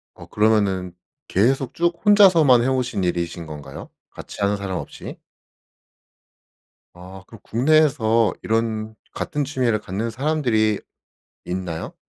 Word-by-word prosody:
어 - - -12
그러면은 100 -4 +1 0.3
계속 130 +6 +1
쭉 170 0 -1
혼자서만 175 - +6
해 - - 0
오신 130 -6 -1
일이신 85 -1 -2
건가요? 75 -3 -9 0.2
같이 - - -10
하는 100 +1 +1
사람 95 -2 -4
없이? - - -8 1.8
아 90 +2 -12
그럼 115 - -14
국내에서 120 -5 +2
이런 110 -1 -2 0.2
같은 145 -1 -3
취미를 125 -5 0
갖는 105 +3 -4
사람들이 120 -5 0 0.7
있나요? 90 -2 -5
110 Hz, 260 characters per minute, -22 LUFS, 95-130 Hz, 1.8 s, 혼자서만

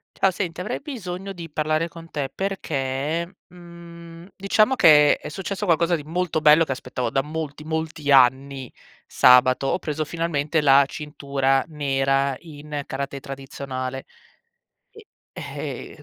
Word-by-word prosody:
Ciao. 195 - +2
Senti, 175 -2 -4
avrei 180 - -3
bisogno 195 - -6
di 170 -3 -9
parlare 155 +2 0
con 165 0 -13
te 140 -4 -3
perché, 165 -2 -3
mhmm, 170 -1 -13
diciamo 215 +6 +2
che 150 - +6
è - - -8
successo 195 +5 -5
qualcosa 170 -1 +2
di 155 - -6
molto 165 +1 -2
bello 155 +2 +6
che 140 - -5
aspettavo 125 -1 -4
da 135 - +1
molti, 150 0 -6
molti 160 -2 -3
anni. 135 0 +3 0.3
Sabato 130 +1 +5
ho 180 - 0
preso 155 -2 -3
finalmente 160 -1 -1
la 140 -1 +6
cintura 140 -3 -1
nera 135 -2 0
in 150 -2 -7
karatè 140 +1 -5
tradizionale 135 -1 -6 1.3
e - - -7
150 Hz, 130 wpm, -23 LUFS, 135-170 Hz, 1.3 s, che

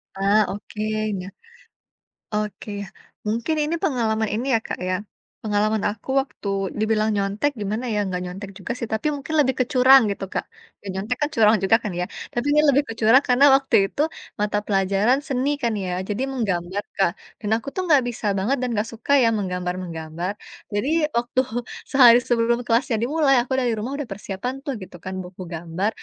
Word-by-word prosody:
Ah. 200 +2 +3
Oke 205 +2 -7 0.4
nya. 180 0 -6 1.1
Oke, 210 0 -3
ya. 200 - -6 0.4
Mungkin 230 +9 0
ini 310 +3 -1
pengalaman 220 -5 +1
ini, 230 +4 -2
ya, - - +3
Kak, - - -5
ya, 185 - +1 0.5
pengalaman 215 0 +1
aku 210 +4 -9
waktu 265 -6 -7 0.3
dibilang 215 0 +2
nyontek, 200 +8 0
gimana 215 +5 -2
ya, 205 -1 0
enggak 180 -2 -3
nyontek 190 +3 -7
juga 200 +3 -5
sih, 240 - -3
tapi 220 +7 0
mungkin 285 +3 -6
lebih 265 -2 +2
ke 255 - +3
curang, 260 +1 +8
gitu, 200 -1 -3
Kak. - - -2 0.4
Ya, 200 - -11
nyontek 205 +6 -2
kan 295 - +2
curang 220 -1 +5
juga 195 +3 +5
kan, 210 - -3
ya. 180 - 0 0.3
Tapi, 240 +2 -2
ini 300 - +5
lebih 285 +1 +4
kecurang 225 +4 +4
karena 250 +3 +5
waktu 270 0 +1
itu 285 - -2 0.4
mata 210 0 0
pelajaran 200 +5 +2
seni 265 -1 0
kan 235 -2 +1
ya, 180 - -3 0.2
jadi 210 +5 -1
menggambar, 200 -6 -2
Kak. 195 -4 +3 0.3
Dan 210 - -3
aku 230 - -11
tuh 375 - -1
enggak 290 -4 +6
bisa 235 -2 -7
banget, 210 +8 +1
dan 250 - -1
enggak 210 - +1
suka 230 +4 -5
ya 230 - +5
menggambar-menggambar. 180 -2 -3 0.4
Jadi, 205 +7 0 0.3
waktu 240 +2 +1 0.5
sehari 245 -3 +8
sebelum 235 0 +1
kelasnya 235 0 +2
dimulai 280 +2 +3
aku 255 +2 -4
dari 245 -3 +1
rumah 250 +6 -3
udah 290 - -3
persiapan 200 +4 -5
tuh, 280 - -2
gitu 180 -1 -10
kan, 185 - -6
buku 180 +1 -11
gambar, 170 +5 -2
220 Hz, 180 wpm, -23 LUFS, 195-250 Hz, 1.1 s, curang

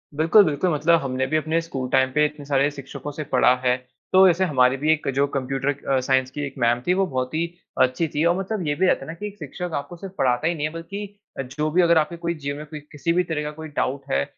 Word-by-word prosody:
बिल्कुल, 165 +7 +6
बिल्कुल 155 +3 0
मतलब 165 +3 +3
हमने 130 -1 -1
भी 155 - +1
अपने 155 +2 0
स्कूल 135 -6 -5
टाइम 130 0 +3
पे 150 0 +4
इतने 150 -1 -5
सारे 140 0 +2
शिक्षकों 140 0 -8
से 155 +2 -5
पढ़ा 125 -1 +5
है, 125 0 +4 0.4
तो 190 0 +8
ऐसे 180 +2 +2
हमारे 130 -4 +3
भी 155 +3 +2
एक 155 - -4
जो 140 +1 +3
कंप्यूटर 135 +1 -1
क 145 - -21
अ, 135 -1 +3
साइंस 130 0 +1
की 145 0 -4
एक 135 - -10
मैम 120 +1 +2
थी, 180 - +4
वो 195 +1 +2
बहुत 130 -3 -3
ही 165 +2 +1 0.4
अच्छी 130 +6 +2
थी 150 0 -1
और 170 +1 +3
मतलब 195 -1 -3
ये 145 - +1
भी 190 +5 +2
रहता 135 - +1
है - - -14
ना 160 - -5
कि 210 +5 -6
एक 205 - -10
शिक्षक 170 +4 -6
आपको 145 +5 -5
सिर्फ 195 +1 -9
पढ़ाता 125 +3 +1
ही 170 - 0
नहीं 150 -2 -2
है, 155 - -9
बल्कि 200 +4 -7 0.2
अ, - - +2
जो 150 +4 -3
भी 180 +3 +4
अगर 170 -1 +4
आपके 155 +2 +1
कोई 170 0 -2
जीवन 140 0 -3
में 150 - -7
कोई 150 0 -8
किसी 150 +3 -1
भी 180 - +2
तरह 160 -3 -3
का 150 - -4
कोई 160 +1 -8
डाउट 135 +2 -1
है, 70 - +2
150 Hz, 280 wpm, -23 LUFS, 135-170 Hz, 0.4 s, तो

